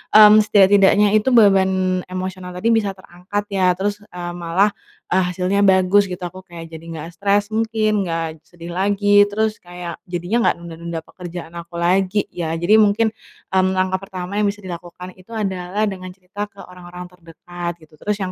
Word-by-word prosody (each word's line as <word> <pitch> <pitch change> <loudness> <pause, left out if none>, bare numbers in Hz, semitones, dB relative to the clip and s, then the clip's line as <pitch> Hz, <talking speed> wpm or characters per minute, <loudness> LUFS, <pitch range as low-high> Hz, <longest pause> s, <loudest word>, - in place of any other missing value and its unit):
mmm, 215 0 +10
setidak-tidaknya 205 -1 +5
itu 215 +4 +3
beban 195 -4 +5 0.4
emosional 185 0 -6
tadi 225 +6 +1
bisa 205 -4 +1
terangkat 185 +3 -5
ya. 185 -2 +2
Terus, 205 +2 -2
eee, 175 -4 -7
malah, 175 +4 +1 0.4
eee, 185 +1 +3
hasilnya 180 +2 -1
bagus, 190 +1 +4
gitu. 180 0 -7
Aku 180 +1 -6
kayak 165 -1 -10
jadi 160 - -8
nggak 165 -1 -6
stres 200 +2 +1
mungkin, 215 -2 0
nggak 165 -1 -3
sedih 170 0 -10
lagi. 205 +2 +3
Terus 215 +1 -1
kayak, 175 -1 -8
jadinya 175 +6 -2
nggak - - 0
nunda-nunda 170 0 -6
pekerjaan 175 -1 -9
aku 170 0 -9
lagi, 185 +4 +1
ya. 165 -2 -3
Jadi 180 +7 +4
mungkin, 215 +1 +3 0.4
mmm, 190 0 +2
langkah 185 0 0
pertama 195 0 -5
yang 210 - +2
bisa 205 0 -4
dilakukan 180 0 -8
itu 185 - -19
adalah 190 0 -2
dengan 185 -3 -3
cerita 195 +2 -6
ke 200 -1 -14
orang-orang 180 0 -11
terdekat, 175 0 -7
gitu. 155 - -20
Terus 210 0 -1
yang 185 - -3
185 Hz, 170 wpm, -20 LUFS, 175-205 Hz, 0.4 s, mmm